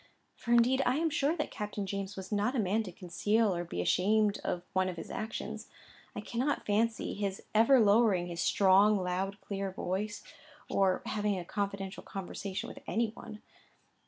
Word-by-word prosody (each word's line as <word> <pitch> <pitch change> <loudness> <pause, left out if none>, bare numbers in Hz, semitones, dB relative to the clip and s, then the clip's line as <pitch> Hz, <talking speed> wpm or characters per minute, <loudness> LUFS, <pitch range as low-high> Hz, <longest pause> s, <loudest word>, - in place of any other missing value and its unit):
For, 235 - -5
indeed 240 +3 +5
I 250 - +2
am 325 0 +1
sure 300 +3 +1
that 300 - -2
Captain 210 -1 -4
James 195 0 -4
was 190 +1 -8
not 210 +5 +1
a - - +1
man 210 +2 +1
to 200 -4 -6
conceal 200 +4 0
or 175 - -2
be 90 - -4
ashamed 205 - +2
of 175 - -2
one 185 0 +2
of 180 - -5
his - - -7
actions. 220 0 -5 0.5
I - - -4
cannot 255 +5 -1
fancy 220 +2 0
his 195 -1 -3
ever 230 +5 +6
lowering 205 -4 +4
his 170 -1 -4
strong 200 +2 +5
loud 190 +2 -2
clear 195 -1 -3
voice, 195 +3 -3 0.4
or 190 -2 +1
having 210 -2 -1
a 175 - -5
confidental 200 -1 -3
conversation 195 0 -5
with - - -9
any 230 0 +1
one. 215 -1 -11
205 Hz, 175 wpm, -31 LUFS, 190-220 Hz, 0.5 s, ever